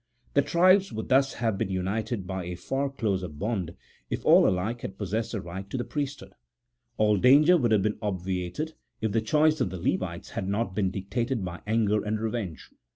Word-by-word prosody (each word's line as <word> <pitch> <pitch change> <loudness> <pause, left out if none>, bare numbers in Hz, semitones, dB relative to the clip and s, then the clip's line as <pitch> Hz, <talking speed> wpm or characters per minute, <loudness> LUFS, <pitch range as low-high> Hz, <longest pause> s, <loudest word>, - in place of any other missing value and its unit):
The 140 - +5
tribes 185 +6 +4
would 110 0 -5
thus 135 +1 +3
have 115 -5 -1
been 110 - -1
united 100 +3 -2
by 95 -1 -4
a 90 +1 -4
far 135 +10 -2
closer 100 -8 -1
bond, 90 +2 -3 0.3
if - - -4
all - - +7
alike 105 +6 -1
had 95 - -6
possessed 110 +4 -2
the 110 - -1
right 95 +3 -7
to 130 - -3
the 120 - -1
priesthood. 145 0 -5 0.6
All 105 -1 +3
danger 145 - +6
would 120 -9 +2
have 105 -3 +4
been 105 0 -1
obviated, 95 - -3 0.3
if 110 -1 -1
the 110 +2 +1
choice 155 +6 +3
of - - +1
the 95 - -6
Levites 85 -1 -2
had 95 - -3
not 100 0 -1
been 95 -1 +1
dictated 115 +4 -2
by 90 0 -6
anger 105 -1 +2
and 105 +1 -1
revenge. 110 -7 -4
105 Hz, 195 wpm, -27 LUFS, 95-120 Hz, 0.6 s, all